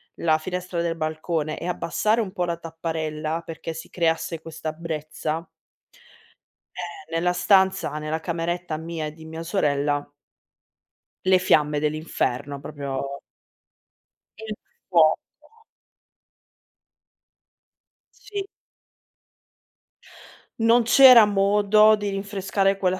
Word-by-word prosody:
la 155 -2 +2
finestra 180 +1 -4
del 170 -1 -1
balcone 155 0 -2
e 170 - -5
abbassare 210 +5 0
un 195 -4 -4
po' 180 -4 -1
la 170 -1 -2
tapparella 160 -1 -4
perché 165 0 -6
si 160 - -9
creasse 165 -1 -1
questa 160 -1 -6
brezza 155 0 -4 1.3
eh, 170 -3 -8
nella 180 +2 +1
stanza, 190 -3 +2
nella 155 +1 -3
cameretta 170 0 -3
mia 160 -1 -4
e 150 - -8
di 160 0 -13
mia 160 +1 -7
sorella 145 -5 0 1.1
le 185 0 +5
fiamme 150 -5 +2
dell'inferno. 145 -2 -2
Proprio 140 -1 -5 1.2
il 220 -1 -6 0.3
fuoco. 165 -4 +5 3.0
Sì. 410 -1 -6 2.1
Non 230 +1 +4
c'era 245 -1 +9
modo 205 +1 +4
di 205 -1 -3
rinfrescare 195 0 0
quella 185 -1 0
165 Hz, 100 wpm, -24 LUFS, 155-195 Hz, 3.0 s, c'era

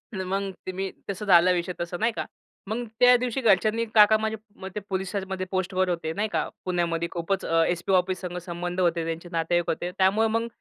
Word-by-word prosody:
मग 190 +1 -2
ते 185 - -3
मी 190 +1 -3 0.2
तसं 200 +2 -4
झालं 180 -1 +6
विषय, 175 +1 -2
तसं 175 +1 -4
नाही 230 +2 +2
का. - - -4 0.4
मग 235 +3 -2
त्या 250 0 +8
दिवशी 250 +1 -2
घरच्यांनी 220 +2 +3
काका 215 0 +7
माझे 220 0 -2 0.3
मग 190 - -4
ते - - -1
पोलिसामध्ये 190 0 -3
पोस्टवर 185 0 0
होते 165 -2 -2
नाही 210 +4 -1
का, - - 0 0.2
पुण्यामध्ये 170 -2 0
खूपच 185 +2 -2
अ, 165 0 +3
एसपी 175 +2 -1
ऑफिससंगं 180 -1 0
संबंध 175 +1 -5
होते, 170 -2 +2
त्यांचे 165 +1 -5
नातेवाईक 170 +1 0
होते. 175 +2 -2
त्यामुळे 200 +4 +3
मग 230 +1 0
185 Hz, 190 wpm, -26 LUFS, 175-205 Hz, 0.4 s, त्या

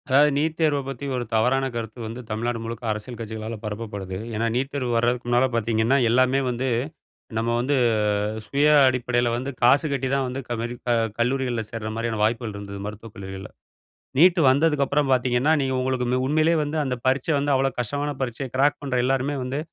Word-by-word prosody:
அதாவது 145 +3 +5
நீட் 155 +2 0
தேர்வ 150 -3 +2
பத்தி 135 0 -6
ஒரு 125 - -1
தவறான 125 +5 +2
கருத்து 115 0 -5
வந்து 115 +3 -6
தமிழ்நாடு 115 +2 -2
முழுக்க 115 +1 -6
அரசியல் 110 +3 -5
கட்சிகளால 110 0 -5
பரப்பப்படுது. 105 -3 -5 0.2
ஏன்னா 115 +2 0
நீட் 135 +3 -1
தேர்வு 130 -4 -2
வரதுக்கு 120 +1 +1
முன்னால 120 +2 +3
பார்த்தீங்கன்னா, 115 +3 +2
எல்லாமே 130 +3 +3
வந்து 125 +2 -2 0.7
நம்ம 115 +1 0
வந்து 135 +4 +1 0.7
சுய 145 +5 +2 0.2
அடிப்படையில 120 -2 +1
வந்து 130 +3 -3
காசு 140 +6 +5
கட்டி 135 -2 -1
தான் 135 -1 +1
வந்து 130 +2 -4
கமரிப்பா 120 +1 -3 0.3
கல்லூரிகள்ல 125 -1 0
சேர்ற 115 -2 -5
மாரியான 115 -1 -2
வாய்ப்புகள் 110 0 0
இருந்தது, 100 0 -7
மருத்துவக் 105 +1 -9
கல்லூரிகள்ல. 95 0 -8 0.7
நீட் 175 +2 +6
வந்ததுக்கப்பறம் 145 -1 +2
பார்த்தீங்கன்னா, 125 +3 +2
நீங்க 135 -1 0
உங்களுக்கு 130 -1 -1
ம் 130 0 +1
உண்மையிலே 155 +4 +3
வந்து 150 +1 -3
அந்த 130 -2 -1
பரீட்சை 135 +4 +2
வந்து 145 +1 0
அவ்வளோ 135 0 +2
கஷ்டமான 145 +5 -1
பரீட்சை. 130 +2 -3
கிராக் 145 +2 +3
பண்ணுற 135 -3 -1
எல்லாருமே 135 +2 0
வந்து, 130 +3 -3
125 Hz, 170 wpm, -24 LUFS, 115-135 Hz, 0.7 s, நீட்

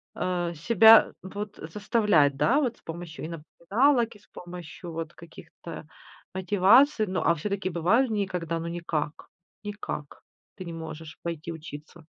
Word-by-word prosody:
а, 175 -1 -1
себя, 220 +7 +7 0.2
э, - - -7
вот, 205 +1 -6
э, - - -7
заставлять, 205 - +2
да, 265 - +3
вот? 250 -6 -1
С - - -26
помощью 165 -1 -7
и - - -4
напоминалок, 225 - +1
и - - -16
с 205 - -26
помощью 175 0 -9
вот 165 0 -5
каких-то, 170 0 -12
а, - - -18 0.5
мотиваций. 210 - +4
Ну, 185 0 -1
а 170 - +4
всё-таки 190 +4 -3
бывают 190 +10 +2
дни, 205 -3 0
когда, 165 -3 -3
ну, 165 - -5
никак 170 -3 -4 0.4
никак 205 -8 -6 0.3
ты 185 - -8
не 170 - -6
можешь 160 -1 -8
пойти 170 -1 -4
учиться? 155 0 -10
175 Hz, 160 wpm, -27 LUFS, 165-210 Hz, 0.5 s, себя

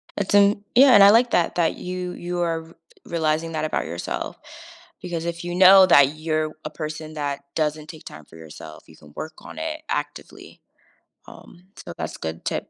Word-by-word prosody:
That's 200 -1 -3
an 205 0 +4
Yeah 265 +2 +7
and 200 - +8
I 200 - +9
like 235 +3 +4
that 175 - +1
that 170 -2 +1
you 180 0 -5
you 175 0 -5
are 165 -1 -1
re 165 +1 -17 0.3
realizing 160 0 -1
that 155 -1 -2
about 155 - -2
yourself. - - -6 0.6
Because 170 -2 -5
if 170 0 -5
you 175 0 -5
know 190 +1 +8
that 145 -4 +5
you're 155 0 -2
w - - -17
a - - -3
person 155 0 -7
that 145 -2 -4
doesn't 155 -1 -2
take 155 -1 -12
time 75 - -11
for 80 - -17
yourself, 80 -1 -12
you - - -18
can 75 - -18
work 155 0 -7
on - - -12
it 320 0 -5
actively. - - -6 0.7
Um, 180 +1 -16
so - - -10
that's - - -6
good 80 +1 -6
tip. - - -4
165 Hz, 200 wpm, -22 LUFS, 155-180 Hz, 0.7 s, I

